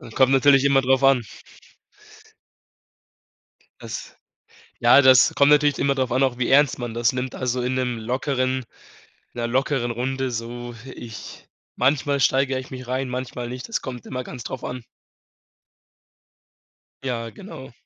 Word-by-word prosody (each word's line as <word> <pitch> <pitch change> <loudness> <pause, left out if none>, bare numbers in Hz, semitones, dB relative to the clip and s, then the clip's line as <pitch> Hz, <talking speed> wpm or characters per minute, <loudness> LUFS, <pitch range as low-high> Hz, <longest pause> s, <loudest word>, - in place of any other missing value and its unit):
Kommt 130 -1 +4
natürlich 135 0 +5
immer 140 -1 +4
drauf 130 +1 +2
an. 135 -3 +4 2.6
Das - - -7 0.6
ja, 120 +4 +6
das 130 -3 +6
kommt 140 0 +4
natürlich 150 -1 +4
immer 140 0 +1
drauf 130 -2 -1
an, 130 +2 +1
auch 130 -3 +1
wie 125 - 0
ernst 140 0 +4
man 120 -2 -5
das 120 +2 +2
nimmt. 130 0 -4
Also 125 -1 -2
in 125 +1 -1
'nem 125 -2 -1
lockeren 130 +2 -1 0.7
in - - -6
'ner 120 - -1
lockeren 130 0 0
Runde 130 +2 -2
so. 120 +1 -6 0.2
Ich 115 -2 -10 0.3
manchmal 140 0 +1
steigere 135 0 +2
ich 130 - -10
mich 130 -1 -8
rein, 130 +1 -2
manchmal 125 -1 -5
nicht. 125 - -7
Das 230 - -2
kommt 125 -3 -7
immer 125 -1 -4
ganz 125 -1 -9
drauf 130 - -6
an. 125 -1 -6 2.2
Ja, 120 -3 -3
genau. 140 - -11
130 Hz, 150 wpm, -23 LUFS, 120-135 Hz, 2.6 s, ja